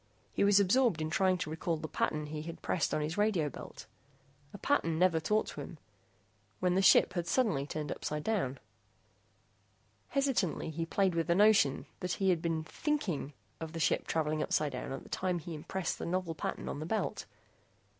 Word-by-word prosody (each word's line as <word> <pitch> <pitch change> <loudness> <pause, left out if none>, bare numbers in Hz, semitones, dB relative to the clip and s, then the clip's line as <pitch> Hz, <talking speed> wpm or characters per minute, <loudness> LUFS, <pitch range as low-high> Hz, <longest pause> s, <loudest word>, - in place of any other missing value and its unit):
He - - +1
was 200 0 +6
absorbed 205 -1 +3
in 155 0 -2
trying 185 +1 +3
to 155 - -4
recall 160 +1 -1
the 155 - -5
pattern 150 0 -1
he 150 0 -5
had 165 +2 -8
pressed 165 - 0
on 155 - 0
his 160 +6 -2
radio 195 -8 +2
belt - - -10 0.7
a - - -8
pattern 165 - +1
never 175 -2 +4
taught 210 +7 +1
to - - -7
him - - -8 0.8
when 180 -1 +2
the 190 - +3
ship 190 -1 +6
had 175 -2 -2
suddenly 170 - +1
turned 150 -1 -4
upsidedown. 150 - -2 1.5
Hesitantly, 245 - 0
he 165 +1 -3
played 190 +1 +2
with 165 0 0
the 170 - +3
notion 205 -9 +4
that 180 0 -2
he 190 -1 +2
had 170 -3 0
been 165 -2 -1
thinking 175 - -2 0.3
of 160 0 -6
the 165 - -4
ship - - +1
traveling 155 -1 0
upsidedown 140 -6 -1
at 135 - -5
the - - -15
time 185 -1 -1
he 170 +1 -7
impressed 170 +4 -3
the - - -4
novel 180 -1 -1
pattern 155 - -4
on - - -4
the 155 - -5
belt. 220 +4 -2
170 Hz, 185 wpm, -32 LUFS, 155-190 Hz, 1.5 s, was